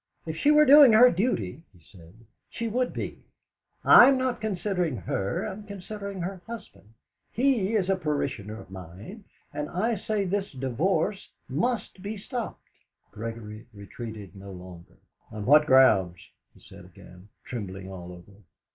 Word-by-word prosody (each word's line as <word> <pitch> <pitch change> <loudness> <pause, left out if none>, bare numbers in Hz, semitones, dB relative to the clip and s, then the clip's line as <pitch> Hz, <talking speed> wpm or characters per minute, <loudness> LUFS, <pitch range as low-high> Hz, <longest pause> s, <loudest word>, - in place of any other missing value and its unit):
"If 160 -1 -5
she 285 - +1
were 300 0 +6
doing 280 -4 +8
her 245 +3 +8
duty," 165 - -1
he 90 - -22
said, 85 0 -18 0.3
"she 230 - -4
would 245 +3 -1
be. - - -7 0.6
I'm 265 +2 +8
not 255 -3 -2
considering 185 - -2
her 95 +1 -3
I'm 210 0 -6
considering 200 -1 -7
her 185 +1 -5
husband; 110 - -11 0.4
he 230 -5 +1
is 195 -4 +1
a 195 - +2
parishioner 140 - -3
of 95 - -14
mine, 95 - -10 0.3
and 150 0 -4
I 220 +7 0
say 210 0 -2
this 195 0 -2
divorce 145 - -1 0.2
must 195 - -2
be 205 +2 -5
stopped." 235 +3 -6 0.5
Gregory 110 0 -8
retreated 105 -1 -9
no 100 0 -11
longer. 90 -2 -12 0.3
"On 105 -1 -6
what 150 +3 +6
grounds?" 105 - +5 0.4
he - - -20
said - - -14
again, 90 +3 -16 0.2
trembling 95 -5 -7
all 90 -1 -9
over. 90 +3 -14
155 Hz, 145 wpm, -26 LUFS, -, 0.6 s, doing